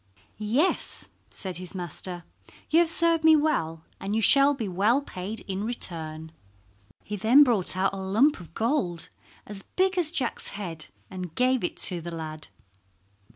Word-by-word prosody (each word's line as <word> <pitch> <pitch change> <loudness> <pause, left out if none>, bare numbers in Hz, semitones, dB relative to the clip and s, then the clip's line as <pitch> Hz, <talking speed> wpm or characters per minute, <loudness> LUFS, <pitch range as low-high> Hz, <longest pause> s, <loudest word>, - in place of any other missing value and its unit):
"Yes," 240 - +1 0.2
said 185 -3 -1
his 185 +2 -3
master, 175 0 -5 0.5
"you 325 - +5
have 340 -1 +3
served 335 -1 +3
me 320 0 +7
well, 165 - -1 0.2
and 200 +2 -3
you 225 - +1
shall 280 +3 +6
be 230 -6 -4
well 205 +8 +2
paid 200 0 -7
in 195 +1 -4
return." 160 -8 -4 0.7
He 210 - -5
then 230 +8 +6
brought 215 -9 +1
out 195 +1 +1
a - - -5
lump 205 +10 +2
of 170 -2 -14
gold 220 - -1 0.4
as 205 -2 -7
big 375 0 +2
as 330 -4 0
Jack's 250 -5 -2
head 165 -6 -7 0.2
and 180 -3 -7
gave 255 -2 +1
it 175 - -3
to 175 -2 +3
the 170 - -6
lad. 155 -2 -7
200 Hz, 160 wpm, -26 LUFS, 175-270 Hz, 0.7 s, me